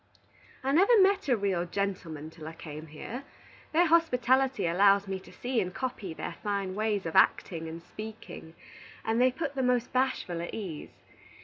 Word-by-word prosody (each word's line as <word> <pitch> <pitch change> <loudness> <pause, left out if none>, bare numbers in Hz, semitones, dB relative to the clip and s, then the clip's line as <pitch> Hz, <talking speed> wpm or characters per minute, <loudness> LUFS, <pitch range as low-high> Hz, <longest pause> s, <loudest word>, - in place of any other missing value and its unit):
"I 270 - +1
never 395 - +6
met 390 -2 +4
a 245 - +4
real 195 -4 0
gentleman 170 -5 -3
till 155 -1 -10
I 160 - -6
came 155 -1 -9
here. 225 - -7 0.5
Their 340 +3 +4
hospitality 265 - +3
allows 195 +3 +4
me 190 -1 -3
to - - -15
see 245 -2 -1
and 185 -2 -3
copy 240 -5 -4
their 160 - -6
fine 200 -2 -2
ways 210 -1 -1
of 165 - -4
acting 165 -2 +3
and 165 +1 -8
speaking, 215 -6 -9 0.5
and 225 +2 +1
they 255 0 +5
put 280 +2 -3
the 270 - -1
most 250 -1 +1
Bashful 255 -10 0
at 170 - -5
ease. 185 -9 -7
205 Hz, 175 wpm, -29 LUFS, 170-255 Hz, 0.5 s, never